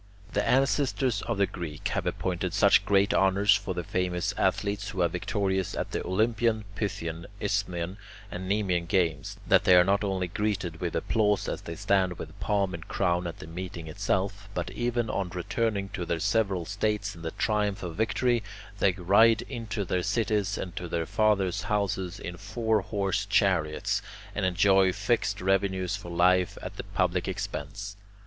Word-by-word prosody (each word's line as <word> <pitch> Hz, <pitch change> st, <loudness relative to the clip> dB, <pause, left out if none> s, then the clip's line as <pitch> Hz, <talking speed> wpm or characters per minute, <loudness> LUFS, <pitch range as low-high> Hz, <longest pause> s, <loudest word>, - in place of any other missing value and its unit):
The -, -, +1 dB
ancestors 130 Hz, -3 st, +2 dB
of 115 Hz, -3 st, -1 dB
the 100 Hz, -, +4 dB
Greeks 80 Hz, -5 st, -5 dB
have -, -, -1 dB
appointed 90 Hz, -2 st, -2 dB
such -, -, +5 dB
great 100 Hz, 0 st, +3 dB
honours 95 Hz, +1 st, +4 dB
for 100 Hz, -3 st, -3 dB
the 90 Hz, -, -2 dB
famous 90 Hz, +2 st, -1 dB
athletes 100 Hz, +2 st, 0 dB
who 95 Hz, -4 st, 0 dB
are -, -, +4 dB
victorious 95 Hz, +1 st, -1 dB
at -, -, -3 dB
the -, -, -2 dB
Olympian, 110 Hz, +2 st, +1 dB
Pythian, 85 Hz, -5 st, -4 dB
Isthmian, 95 Hz, -3 st, -2 dB, 0.3 s
and 95 Hz, +1 st, -5 dB
Nemean 95 Hz, -4 st, +1 dB
games, 95 Hz, +1 st, 0 dB
that 95 Hz, +1 st, +4 dB
they 95 Hz, -4 st, +6 dB
are 90 Hz, -, +8 dB
not 100 Hz, +3 st, +2 dB
only 95 Hz, -2 st, -1 dB
greeted 100 Hz, -2 st, -2 dB
with -, -, -2 dB
applause 105 Hz, -2 st, +1 dB
as -, -, -3 dB
they 85 Hz, -, -6 dB
stand 95 Hz, -1 st, +1 dB
with -, -, -9 dB
palm 100 Hz, -3 st, 0 dB
and 85 Hz, -1 st, -7 dB
crown 90 Hz, -2 st, 0 dB
at 85 Hz, -, -6 dB
the -, -, -9 dB
meeting 85 Hz, 0 st, -6 dB
itself, 100 Hz, +3 st, -2 dB
but 90 Hz, 0 st, -2 dB
even 120 Hz, +2 st, -1 dB
on 100 Hz, -3 st, -2 dB
returning 100 Hz, +3 st, -1 dB
to 90 Hz, -, -4 dB
their 85 Hz, -1 st, -1 dB
several 100 Hz, -3 st, +1 dB
states 100 Hz, 0 st, -1 dB
in 85 Hz, -, -12 dB
the 80 Hz, -, -3 dB
triumph 105 Hz, +1 st, 0 dB
of 85 Hz, -2 st, -5 dB
victory, 120 Hz, +2 st, +1 dB, 0.4 s
they 95 Hz, -, +4 dB
ride 100 Hz, +5 st, +4 dB
into 115 Hz, -5 st, -4 dB
their 90 Hz, 0 st, 0 dB
cities 105 Hz, -1 st, 0 dB
and 90 Hz, -, -5 dB
to 90 Hz, -, -4 dB
their 85 Hz, -1 st, -1 dB
fathers' 100 Hz, -3 st, +1 dB
houses 100 Hz, -4 st, -1 dB
in 85 Hz, 0 st, -6 dB
four 110 Hz, +2 st, 0 dB
horse 100 Hz, +1 st, -1 dB
chariots, 90 Hz, -7 st, +1 dB, 0.3 s
and 100 Hz, -2 st, 0 dB
enjoy 95 Hz, +1 st, +4 dB
fixed 105 Hz, +1 st, 0 dB
revenues 95 Hz, 0 st, +1 dB
for 100 Hz, -4 st, -8 dB
life 90 Hz, +1 st, +3 dB
at -, -, -7 dB
the -, -, -4 dB
public -, -, 0 dB
expense. 100 Hz, +8 st, -5 dB
100 Hz, 170 wpm, -28 LUFS, 90-105 Hz, 0.4 s, are